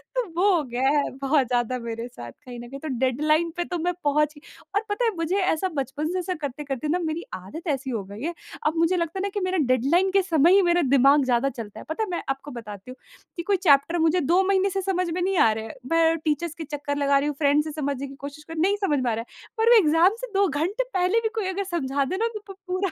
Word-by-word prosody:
तो - - +1 0.2
वो 400 +1 +5
हो 315 - +1
गया 255 +1 0
है 290 0 +2
बहुत 275 -2 +2
ज़्यादा 245 0 0
मेरे 230 0 -5
साथ 120 - -10
कहीं 245 - -11
न 240 0 -9
कहीं 275 +1 -8
तो 315 - -7
डेडलाइन 305 +6 +2
पे 350 - 0
तो 355 - -3
मैं 355 +2 0
पहुँच 300 +1 +2 0.4
और 410 - +3
पता 470 +4 0
है 450 - +2
मुझे 330 +4 -1
ऐसा 370 +1 +1
बचपन 285 +3 -2
से 370 - -1
ऐसा 365 +1 -2
करते-करते 285 0 -4
न 350 +3 0
मेरी 320 +2 -3
आदत 200 - -8
ऐसी 270 -1 -3
हो 225 -5 -2
गई 200 +4 -10
है। 340 +2 -2 0.3
अब 315 - 0
मुझे 335 +2 +2
लगता 335 +2 -2
है 395 - -1
न - - -3
कि 410 - -1
मेरा 370 0 0
डेडलाइन 280 +10 +2
के 390 0 +4
समय 335 -1 +4
ही 400 - +6
मेरा 350 0 +3
दिमाग 275 +1 +5
ज़्यादा 250 +2 +2
चलता 220 -4 -8
है। - - -9
पता 380 +8 -1
है 415 - -4
मैं 345 - -3
आपको 270 +2 -4
बताती 210 -1 -9
हूँ 255 - -11 0.4
कि 340 - -3
कोई 395 +1 +1
चैप्टर 285 +5 +5
मुझे 325 +3 +3
2 345 +7 +3
महीने 395 0 +3
से 385 +1 -2
समझ 365 -2 -1
में 355 +2 -2
नहीं 380 0 0
आ 225 - +5
रहा 220 - -6
है। 220 - -9 0.2
मैं 330 0 +4
टीचर्स 310 +1 -1
के 325 - -6
चक्कर 290 -1 -4
लगा 280 -1 +3
रही 290 - -1
हूँ 295 - -2
फ्रेंड्स 295 +1 +3
से 310 - -4
समझने 280 -2 -3
की 275 - -11
कोशिश 285 +2 -9
कर 325 - -10
रही 320 - -5
हूँ, - - +3
नहीं 405 +1 +1
समझ 290 -2 +1
में 240 - +1
आ - - 0
रहा 230 +1 -5
है। - - -17
पर 450 +1 +3
वो 480 - +8
एग्ज़ाम 335 +4 +4
से - - -4
2 395 0 +4
घंटे 355 +10 -1
पहले 370 +4 +2
भी 445 - 0
कोई 430 -4 -1
अगर 395 +1 -2
समझा 280 -6 -1
दे 370 +7 -3
न - - 0
तो 425 - -3
प - - -21
पूरा, 370 0 -1
310 Hz, 280 wpm, -25 LUFS, 270-360 Hz, 0.4 s, वो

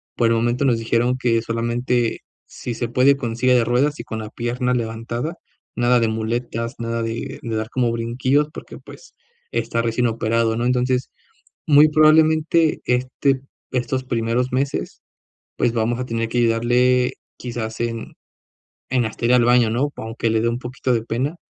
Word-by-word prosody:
por 120 - +2
el 115 - +3
momento 120 +3 0
nos 120 -3 +2
dijeron 120 +2 +1
que 115 -3 +1
solamente 120 +1 -1 0.2
si 120 - -6
se 120 +1 -2
puede 130 +3 +4
con 120 -4 -4
silla 125 +1 +3
de 120 -2 +3
ruedas 140 +5 +1
y - - -5
con 110 - -5
la 110 -1 -6
pierna 125 +2 -2
levantada, 120 +5 -3 0.4
nada 120 0 +3
de 115 - +2
muletas, 115 +2 -3
nada 115 0 -2
de 115 +1 -4
de 115 -1 -4
dar 110 +1 -3
como 125 -2 0
brinquillos 130 +5 0
porque, - - -9
pues, - - -15 0.4
está 115 - -1
recién 115 +1 0
operado, 115 0 0
¿no?, 120 - -1
entonces, 125 0 +1 0.6
muy 150 +1 +7
probablemente, 155 +1 +4
este 130 +2 0 0.3
estos 130 +1 -1
primeros 120 0 -1
meses, 135 +2 -2 0.5
pues, 120 - +1
vamos 115 +1 0
a 125 - -3
tener 115 -1 -2
que 120 - -1
ayudarle 120 +2 +3 0.3
quizás 115 -2 -5
en 115 -1 -4 0.8
en 125 -2 +2
hasta 110 +2 -6
ir 120 - +4
al 120 - +4
baño, 120 -2 +4
¿no? 140 +5 0
Aunque 115 +1 -3
le 110 0 +2
dé 115 - +1
un 120 +1 -1
poquito 125 0 -3
de 115 -2 +1
pena, 130 +8 -2
120 Hz, 175 wpm, -21 LUFS, 115-125 Hz, 0.8 s, muy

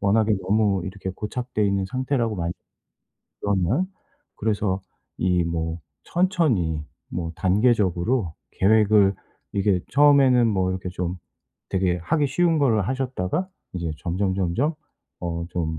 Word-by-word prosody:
워낙에 110 +2 +3
너무 100 -2 +2
이렇게 95 0 -5
고착되어 105 +3 -3
있는 100 -1 +1
상태라고 130 -2 -1
많이 85 0 -2 0.9
그러면. 100 - +1 0.5
그래서 100 -3 0 0.4
이 90 -1 +2
뭐 80 0 -2 0.3
천천히 130 - +1 0.3
뭐 85 -2 -3
단계적으로 100 -1 +2 0.2
계획을 105 -1 +4 0.4
이게 100 -2 +2
처음에는 135 -4 +5
뭐 95 -3 +1
이렇게 95 0 -4
좀 90 0 -3 0.5
되게 90 -2 +1
하기 150 - +1
쉬운 165 +2 +2
거를 110 -9 +2
하셨다가 130 - -2 0.3
이제 85 -3 -2
점점 95 +2 -1
점점 100 - 0 0.5
어 85 -1 -3
좀 80 -2 -2
100 Hz, 270 characters per minute, -24 LUFS, 90-125 Hz, 0.9 s, 처음에는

